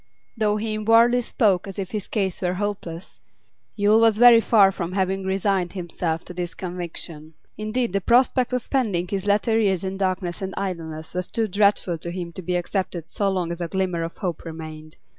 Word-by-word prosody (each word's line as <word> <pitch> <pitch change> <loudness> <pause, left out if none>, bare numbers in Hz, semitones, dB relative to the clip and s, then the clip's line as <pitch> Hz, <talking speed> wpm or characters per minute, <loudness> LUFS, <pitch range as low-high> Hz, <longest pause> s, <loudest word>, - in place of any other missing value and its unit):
Though 215 -2 +1
he 215 0 -2
inwardly 230 +3 +4
spoke 205 -6 +1
as 195 - -8
if 190 -2 -4
his 210 -3 -4
case 195 -4 -2
were 180 -1 0
hopeless, 190 -4 -5 0.6
Yule 210 +1 +4
was 225 -2 +4
very 235 -1 +8
far 205 -4 +5
from 180 -2 -4
having 190 0 0
resigned 190 -2 0
himself 170 -3 -3
to - - -9
this 175 -1 -4
conviction; 170 -3 -7 0.2
indeed, 215 +1 -2
the 200 - +1
prospect 250 +4 +3
of 250 -1 -1
spending 205 -10 0
his 195 +1 -3
latter 210 +2 +2
years 195 -4 +1
in 190 0 -3
darkness 185 -2 -2
and 190 0 -4
idleness 165 -5 -5
was 180 +1 -2
too 225 -1 -1
dreadful 200 -4 +2
to 170 - -5
him 175 -1 -5
to 185 - -6
be 180 +1 -2
accepted 175 -2 -2
so 200 -1 0
long 180 -3 -1
as 170 +1 -5
a 170 - -1
glimmer 185 -2 -1
of 165 0 -5
hope 180 -6 -3
remained. 155 -1 -9
190 Hz, 195 wpm, -23 LUFS, 175-210 Hz, 0.6 s, very